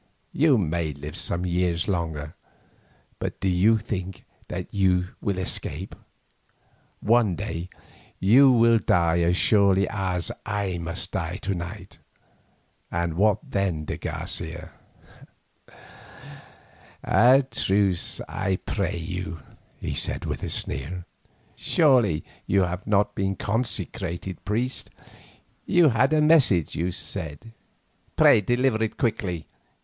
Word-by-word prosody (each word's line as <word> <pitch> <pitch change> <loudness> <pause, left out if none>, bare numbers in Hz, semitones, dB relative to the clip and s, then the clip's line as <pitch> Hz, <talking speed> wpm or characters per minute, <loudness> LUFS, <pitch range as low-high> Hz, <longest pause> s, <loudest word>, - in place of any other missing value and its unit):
You 145 -3 +4
may 85 -4 -1
live 75 +2 -8
some 90 +1 -1
years 90 -1 0
longer, 80 -6 -3 0.9
but - - -4
do 95 - -1
you 95 +5 +4
think 95 -4 -5 0.2
that 90 0 -4
you 90 -2 +2
shall 100 -2 -1
escape? 95 -1 -3 1.1
One 110 -4 +3
day 85 +2 -5 0.5
you 130 +8 +6
will 115 -1 +5
die 85 -3 +2
as 85 +1 +2
surely 100 -2 +4
as 95 -4 -2
I 100 -4 -2
must 85 +2 -5
die 85 +1 -3
to 100 - -1
night, 90 +2 -7 0.9
and 85 -1 -1
what 105 +5 +2
then, 95 -6 -1
de - - -4
Garcia?" - - -4 2.3
"A 130 +4 +5
truce, 95 -2 +1
I 95 -1 -1
pray 95 -1 -3
you," 90 0 -5 0.4
he - - -4
said - - -1
with - - -4
a - - -3
sneer. 85 +6 -3 0.5
"Surely 125 - +3 0.2
you 95 0 +3
have 90 +1 -4
not 105 -1 +2
been 95 0 -1
consecrated 95 -5 -3
priest. 120 +6 -2 0.8
You 175 -3 +5
had 125 +4 +2
a 155 -1 +3
message, 140 - +4
you 90 +2 -1
said. 85 +1 -6 0.6
Pray - - +6
deliver 120 0 +1
it 110 - -3
quickly. 95 -8 -2
95 Hz, 120 wpm, -25 LUFS, 85-110 Hz, 2.3 s, you